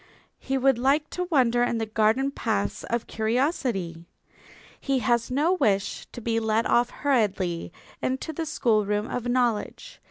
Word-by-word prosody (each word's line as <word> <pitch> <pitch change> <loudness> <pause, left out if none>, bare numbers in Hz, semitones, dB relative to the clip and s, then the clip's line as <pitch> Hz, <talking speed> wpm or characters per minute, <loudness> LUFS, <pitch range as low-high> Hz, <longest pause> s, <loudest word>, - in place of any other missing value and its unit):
He 270 0 -2
would 265 -2 +3
like 280 +4 +1
to 360 0 -3
wander 245 -6 +3
in 245 -1 +1
the 225 - -1
garden 220 +5 +1
paths 100 - -2
of 235 0 -2
curiosity. 220 - -1 0.8
He 275 -1 0
has 235 0 +1
no 295 +8 +2
wish 205 - 0
to - - -8
be 230 0 0
led 220 0 +1
off 240 0 +3
hurriedly 200 - 0 0.3
into 265 +5 -2
the 320 +1 -4
schoolroom 215 -6 +1
of 245 -1 -4
knowledge. 245 - -1
240 Hz, 150 wpm, -26 LUFS, 215-270 Hz, 0.8 s, would